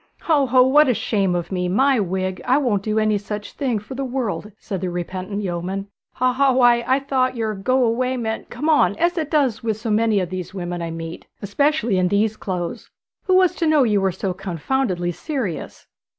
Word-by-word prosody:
'Ho, 295 Hz, -5 st, +2 dB
ho; 255 Hz, 0 st, +5 dB
what 290 Hz, +3 st, +5 dB
a 250 Hz, -, +2 dB
shame 195 Hz, -5 st, 0 dB
of 175 Hz, +1 st, -3 dB
me! 180 Hz, -1 st, -1 dB
My 265 Hz, +6 st, +3 dB
wig, 185 Hz, -1 st, -2 dB
I 255 Hz, +2 st, +3 dB
won't 240 Hz, -9 st, +1 dB
do 215 Hz, +1 st, -2 dB
any 215 Hz, -1 st, +2 dB
such 205 Hz, +1 st, -6 dB
thing 260 Hz, -6 st, -1 dB
for 210 Hz, +6 st, -8 dB
the 275 Hz, +1 st, -3 dB
world,' 245 Hz, -5 st, -3 dB
said 195 Hz, -5 st, -5 dB
the 185 Hz, -, -2 dB
repentant 185 Hz, +3 st, -4 dB
yeoman. 190 Hz, +2 st, -3 dB, 0.2 s
'Haw, 255 Hz, 0 st, +1 dB
haw; 270 Hz, +1 st, +3 dB
why, 240 Hz, -2 st, +4 dB
I 260 Hz, +1 st, +4 dB
thought 265 Hz, -2 st, 0 dB
your 220 Hz, -2 st, -1 dB
"go 255 Hz, +6 st, +1 dB
away" 255 Hz, +3 st, 0 dB
meant 220 Hz, -2 st, -4 dB
"come 250 Hz, +6 st, -4 dB
on," 315 Hz, -2 st, +4 dB
as 345 Hz, +1 st, +1 dB
it 315 Hz, -4 st, -2 dB
does 275 Hz, -8 st, +1 dB
with 220 Hz, -2 st, -1 dB
so 220 Hz, 0 st, -3 dB
many 215 Hz, -1 st, +2 dB
of 180 Hz, -2 st, -3 dB
the 185 Hz, -1 st, -3 dB
women 175 Hz, -1 st, -4 dB
I 170 Hz, -, -3 dB
meet, 165 Hz, 0 st, -7 dB, 0.2 s
especially 240 Hz, -1 st, +1 dB
in 180 Hz, -, +2 dB
these 210 Hz, +3 st, +1 dB
clothes. 180 Hz, -5 st, -5 dB, 0.4 s
Who 370 Hz, -, +3 dB
was 370 Hz, -1 st, +4 dB
to 330 Hz, -, +1 dB
know 310 Hz, -3 st, +4 dB
you 210 Hz, -4 st, +2 dB
were 190 Hz, -1 st, +2 dB
so 185 Hz, +1 st, -3 dB
confoundedly 185 Hz, -, -2 dB
serious?' 235 Hz, -, -5 dB
220 Hz, 210 wpm, -21 LUFS, 190-260 Hz, 0.4 s, ho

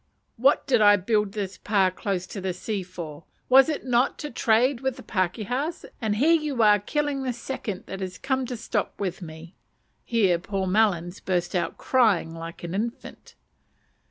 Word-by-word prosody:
What 265 Hz, +5 st, +3 dB
did 250 Hz, -5 st, +3 dB
I 205 Hz, -1 st, +7 dB
build 210 Hz, 0 st, 0 dB
this 195 Hz, -3 st, -4 dB
pa 195 Hz, -3 st, +2 dB
close 185 Hz, -1 st, -3 dB
to 195 Hz, +2 st, -7 dB
the 185 Hz, -1 st, -2 dB
sea 200 Hz, +2 st, -3 dB
for? 170 Hz, -4 st, -8 dB, 0.2 s
was 270 Hz, +3 st, +7 dB
it 305 Hz, -, -3 dB
not 250 Hz, +1 st, +2 dB
to 295 Hz, -, -5 dB
trade 235 Hz, +3 st, +2 dB
with 265 Hz, -2 st, -1 dB
the 255 Hz, -, -11 dB
pakehas? 220 Hz, -, -2 dB, 0.2 s
and 215 Hz, -2 st, 0 dB
here 300 Hz, +10 st, +4 dB
you 300 Hz, -7 st, +1 dB
are 210 Hz, -1 st, +6 dB
killing 290 Hz, +6 st, -1 dB
the 260 Hz, -1 st, -1 dB
second 235 Hz, -5 st, -5 dB
that 195 Hz, -, -7 dB
has 185 Hz, -1 st, -5 dB
come 265 Hz, -1 st, -1 dB
to 245 Hz, -, -4 dB
stop 215 Hz, -2 st, -3 dB
with 190 Hz, -2 st, -3 dB
me! 165 Hz, +1 st, -10 dB, 0.5 s
(Here 195 Hz, -7 st, +2 dB
poor 195 Hz, +1 st, -3 dB
Melons 185 Hz, -3 st, +1 dB
burst 175 Hz, -1 st, -1 dB
out 175 Hz, -3 st, -1 dB
crying 215 Hz, -10 st, +2 dB
like 165 Hz, +1 st, -8 dB
an 170 Hz, 0 st, -5 dB
infant.) 230 Hz, +6 st, -5 dB
210 Hz, 180 wpm, -25 LUFS, 185-250 Hz, 0.5 s, I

